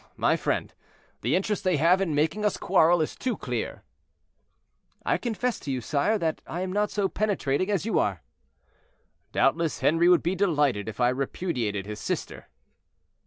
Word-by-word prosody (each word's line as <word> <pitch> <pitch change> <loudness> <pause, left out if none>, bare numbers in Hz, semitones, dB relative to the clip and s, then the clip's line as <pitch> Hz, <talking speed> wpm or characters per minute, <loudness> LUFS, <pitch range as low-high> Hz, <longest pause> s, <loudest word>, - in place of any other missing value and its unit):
"Oh, - - -28
my - - +3
friend, - - -2 0.5
the - - +1
interest 200 +3 -1
they 185 -4 +2
have 170 +6 +4
in 165 -6 0
making 160 +8 0
us 210 - +1
quarrel 175 -2 +4
is - - -5
too 255 -1 -2
clear." - - -4 1.2
"I - - +1
confess 240 +1 -2
to 140 - -5
you, 130 - -1
sire, 145 - +1
that 165 -5 -2
I 175 - -4
am 185 0 -3
not 210 +1 +1
so 200 -2 0
penetrating 185 -5 0
as 200 -2 0
you 225 - +1
are." 95 -4 -1 1.1
"Doubtless 160 +3 +1
Henri 165 +3 +4
would 180 - +5
be 175 - +1
delighted 145 - +1
if 110 - -9
I 120 0 +4
repudiated 125 - -2
his 105 0 -6
sister." - - -4
170 Hz, 170 wpm, -26 LUFS, 140-195 Hz, 1.2 s, would